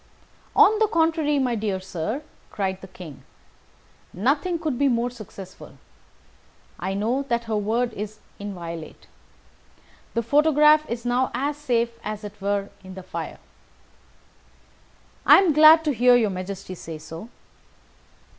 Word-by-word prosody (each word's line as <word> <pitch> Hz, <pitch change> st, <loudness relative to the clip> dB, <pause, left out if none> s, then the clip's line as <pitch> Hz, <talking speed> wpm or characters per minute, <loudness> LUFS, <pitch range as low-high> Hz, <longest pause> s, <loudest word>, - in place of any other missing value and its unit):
"On 430 Hz, +1 st, +6 dB
the 440 Hz, -, +4 dB
contrary, 320 Hz, -5 st, +1 dB
my 255 Hz, -3 st, +1 dB
dear 210 Hz, -4 st, -2 dB
sir," 190 Hz, -, -4 dB, 0.3 s
cried 190 Hz, -2 st, -3 dB
the 190 Hz, -, -10 dB
King; 175 Hz, -6 st, -11 dB, 0.9 s
"nothing 285 Hz, -, 0 dB
could 310 Hz, -7 st, -3 dB
be 285 Hz, -, +3 dB
more 240 Hz, -1 st, 0 dB
successful. 200 Hz, -5 st, -11 dB, 1.0 s
I 190 Hz, +1 st, -3 dB
know 230 Hz, +7 st, 0 dB
that 235 Hz, 0 st, 0 dB
her 225 Hz, -1 st, -3 dB
word 225 Hz, +3 st, 0 dB
is 215 Hz, +1 st, -6 dB, 0.2 s
inviolate. 170 Hz, -5 st, -7 dB, 1.1 s
The 230 Hz, -, +1 dB
photograph 300 Hz, +3 st, +4 dB
is 235 Hz, 0 st, -4 dB
now 245 Hz, +1 st, +1 dB
as 285 Hz, +3 st, -1 dB
safe 240 Hz, -5 st, 0 dB
as 215 Hz, 0 st, -5 dB
if 205 Hz, -1 st, -7 dB
it -, -, -29 dB
were 200 Hz, 0 st, -1 dB
in 185 Hz, 0 st, -10 dB
the 190 Hz, -, -8 dB
fire." 185 Hz, -, -6 dB, 1.9 s
"I -, -, +8 dB
am 375 Hz, -5 st, +4 dB
glad 310 Hz, +2 st, +8 dB
to 295 Hz, -, +1 dB
hear 245 Hz, 0 st, +5 dB
your 220 Hz, -4 st, +2 dB
Majesty 185 Hz, +1 st, -6 dB
say 165 Hz, -3 st, -8 dB
so." 165 Hz, +8 st, -10 dB
230 Hz, 140 wpm, -24 LUFS, 195-285 Hz, 1.9 s, I